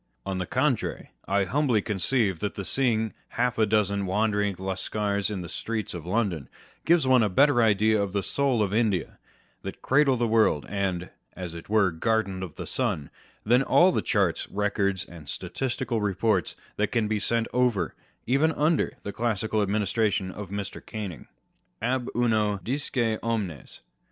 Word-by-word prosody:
On 95 -1 -2
the 90 - -3
contrary, - - -1 0.2
I 100 0 +2
humbly 125 +2 +2
conceive 105 -2 0
that 105 0 -3
the 100 - -5
seeing 110 -4 +1 0.2
half 125 0 +1
a 110 - +4
dozen 100 -2 +1
wandering 105 0 +1
Lascars 100 +2 -1
in 100 -3 -3
the 85 - -6
streets 110 +4 -3
of 85 -1 -7
London 90 - -1 0.4
gives 165 -3 +4
one 130 -2 +5
a 105 - +2
better 135 +5 +4
idea 110 -1 +3
of 100 -1 -2
the 100 0 -1
soul 135 -6 +1
of 100 -1 -2
India, 105 -6 0 0.4
that - - -8
cradle 140 0 +4
of - - -5
the 120 - +2
world, 110 -10 +3
and 95 -3 -2 0.2
(as 90 -3 -6
it 85 +2 -10
were) 105 -3 +3
garden 95 +2 0
of 90 -5 -6
the - - -6
sun, 70 -2 -2 0.3
than 120 +4 +4
all 175 +6 +5
the - - 0
charts, 100 -6 0
records, 100 -2 0
and 80 -6 -11
statistical 120 -3 -2
reports 100 -2 +1 0.2
that 105 - +2
can 115 -3 +1
be 105 0 0
sent 115 +2 0
over, 125 -5 +1 0.3
even 140 +6 +3
under 155 +3 +1
the 100 - -5
classical 110 -2 0
administration 100 -2 0
of 100 -1 -7
Mr. 100 0 -5
Canning. 100 - -6 0.5
Ab 125 +1 -1
uno 110 -4 +2
disce 120 -4 -1
omnes. 105 - -3
105 Hz, 165 wpm, -26 LUFS, 95-115 Hz, 0.5 s, one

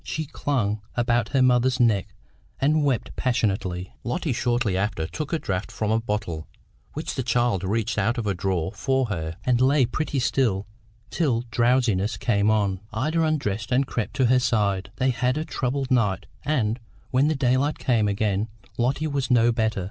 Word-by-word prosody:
She 155 - -3
clung 115 -8 -1
about 120 -2 +1
her 135 -2 +3
mother's 125 +1 +3
neck 110 -6 +2 0.4
and 150 +2 +3
wept 135 -5 -1
passionately. 95 -7 -1
Lotty 140 +3 -1
shortly 120 -4 0
after 95 -4 -1
took 155 - -5
a 165 - +2
draught 100 -8 -3
from 105 -1 -2
a 110 - +3
bottle 105 -8 -3 0.5
which 155 - -4
the 130 - -2
child 120 -5 +1
reached 110 +4 -1
out 120 +3 +1
of 115 - -2
a 100 - +1
drawer 90 -1 -1
for 135 -3 0
her, 80 -4 -4
and 125 -1 +2
lay 135 0 +4
pretty 145 +4 -2
still 120 -6 +1 0.5
till 130 -9 +1
drowsiness 115 -3 +2
came 105 -3 +2
on. 100 -3 +1
Ida 150 +9 0
undressed 135 -10 -1
and 130 +3 +3
crept 115 -5 -3
to 130 - +3
her 125 +1 +4
side. 100 -6 0
They 130 +3 +1
had 125 +2 0
a 155 - -2
troubled 135 -2 -2
night, 105 -7 +2 0.2
and, 120 -6 0 0.3
when 135 +3 +3
the 155 - +1
daylight 135 +2 +1
came 115 -5 +1
again, 100 +1 0 0.3
Lotty 135 +6 +1
was 140 -4 -1
no 120 -1 +4
better. 110 -3 0
120 Hz, 175 wpm, -24 LUFS, 105-130 Hz, 0.5 s, lay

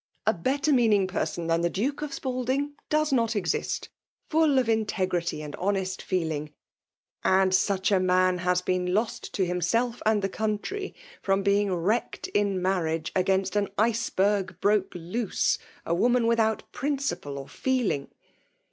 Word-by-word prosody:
A 220 - +4
better 275 - +1
meaning 220 -6 +4
person 170 -2 -2
than 165 0 +1
the 170 - +2
Duke 260 - -2
of 300 - -3
^lalding 265 +1 -2 0.2
does 305 -1 +2
not 230 -3 +2
exist 180 -4 -1 0.2
— - - -38
^fuU 310 -4 +4
of 250 - 0
integrity 185 -7 0
and 150 -1 -6
honest 190 -1 -1
feeling; 160 -5 -2 0.7
and 190 0 +3
such 190 +1 +2
a 195 - +4
man 185 0 +3
has 180 0 +1
been 180 0 0
lost 220 +2 -2
to 190 - +2
himself 205 +8 0
and 215 -2 +2
the - - +2
country, 220 - -3 0.3
firom 195 0 +1
being 200 0 +2
wrecked 190 +7 -1
in 200 -2 +1
marriage 170 -3 -1
against 190 0 +1
an 205 -1 +2
iceberg 205 -4 +1
broke 205 -1 +2
loose 180 +6 -1
— - - -27
a 170 - 0
woman 240 +6 +3
without 225 -1 +2
principle 260 - -2
or 135 0 -7
feeling. 245 - -1
200 Hz, 155 wpm, -27 LUFS, 180-235 Hz, 0.7 s, A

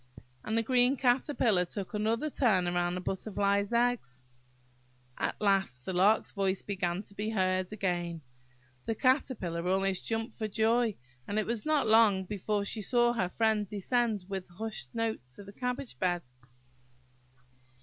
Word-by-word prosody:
And 220 +1 -1
the 230 - +2
green 250 +3 +3
Caterpillar 245 -6 +2
took 190 +3 -6
another 225 +8 0
turn 205 -11 +3
round 175 0 0
the - - -4
Butterfly's 200 +1 0
eggs. 235 - 0 1.0
At - - -2
last 195 -11 +1
the 190 - -3
Lark's 195 +5 +3
voice 195 -1 -1
began 185 -1 -2
to 200 - -16
be 210 +2 -3
heard 185 -3 0
again. 175 -5 -2 0.7
The 225 - 0
Caterpillar 210 - 0
almost 190 0 0
jumped 225 +1 -2
for 215 - -1
joy 225 +1 +2 0.3
and 205 - -2
it 215 - +1
was 230 +3 -3
not 305 -2 +3
long 215 -3 +5
before 205 +1 -2
she 215 +2 -2
saw 240 +2 +3
her 185 -7 0
friend 215 0 +1
descend 210 0 0
with 190 -2 -5
hushed 180 - -5
note 225 -1 -1
to 205 - -10
the 200 +1 -12
cabbage 250 +3 -4
bed. 175 -2 0
210 Hz, 150 wpm, -30 LUFS, 185-230 Hz, 1.0 s, long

